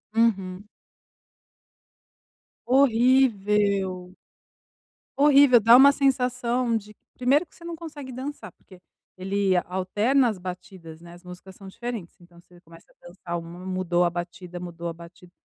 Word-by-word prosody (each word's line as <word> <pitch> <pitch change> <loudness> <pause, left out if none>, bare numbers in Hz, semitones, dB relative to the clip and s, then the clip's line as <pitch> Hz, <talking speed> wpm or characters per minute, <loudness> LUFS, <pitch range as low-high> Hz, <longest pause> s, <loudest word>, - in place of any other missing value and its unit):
Uhum. 200 -4 0 2.0
Horrível. 210 -8 +2 1.1
Horrível. 280 -3 +6
Dá 230 +2 +6
uma 275 +3 +8
sensação 250 -3 0
de 210 0 -11 0.2
primeiro 270 +5 +2
que - - -26
você 335 - -15
não 340 0 -6
consegue 305 -5 -9
dançar, 255 - -7
porque 185 0 -19 0.4
ele 195 0 -1
alterna 210 +8 +1
as 215 - -5
batidas, 180 -3 -10
né? 170 0 -13
As 175 +1 -16
músicas 180 +1 -12
são 195 0 -13
diferentes. 230 -3 -7
Então 175 0 -19
você 175 0 -21
começa 165 0 -18
a - - -18
dançar 175 -1 -6
uma, 170 +2 -11
mudou 185 -2 0
a 175 - 0
batida 175 +1 -7
mudou 170 -1 -7
a 170 - -4
batida. 170 +1 -15
195 Hz, 135 wpm, -24 LUFS, 180-250 Hz, 2.0 s, uma